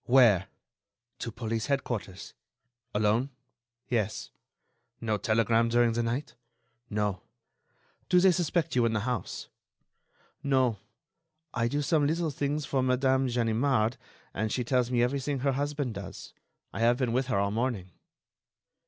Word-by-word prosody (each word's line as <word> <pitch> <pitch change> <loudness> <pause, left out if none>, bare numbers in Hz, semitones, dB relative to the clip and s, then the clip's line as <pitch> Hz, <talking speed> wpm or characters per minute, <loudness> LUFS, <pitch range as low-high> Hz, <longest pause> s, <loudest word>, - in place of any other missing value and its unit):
"Where?" 115 -7 +5 0.7
"To 115 - -4
police 115 +1 -3
headquarters." 120 -9 -3 0.6
"Alone?" 110 +5 +2 0.6
"Yes." 110 -3 -1 0.7
"No 110 -2 0
telegram 115 +2 +2
during 120 0 +4
the 120 - 0
night?" 120 +5 -2 0.6
"No." 105 -3 -1 0.9
"Do 180 - +6
they 185 +1 +6
suspect 170 -2 0
you 125 - +4
in 115 - -1
the 110 - 0
house?" 115 -4 -3 0.9
"No; 130 -6 +2 0.7
I 115 -1 +1
do 145 +4 -1
some 145 0 +2
little 165 +1 0
things 145 +2 -2
for 135 -1 0
Madame 130 +1 +2
Ganimard, 120 0 +1 0.4
and 110 +2 -1
she 125 - 0
tells 125 0 +1
me 120 -1 +2
everything 140 +1 -1
her 140 +1 +2
husband 145 -2 -2
does. 100 -1 -8 0.4
I - - -5
have 120 +1 +4
been 125 -3 0
with 130 +1 +1
her 125 - +1
all 100 0 +1
morning." 110 -5 -2
120 Hz, 135 wpm, -29 LUFS, 110-135 Hz, 0.9 s, Do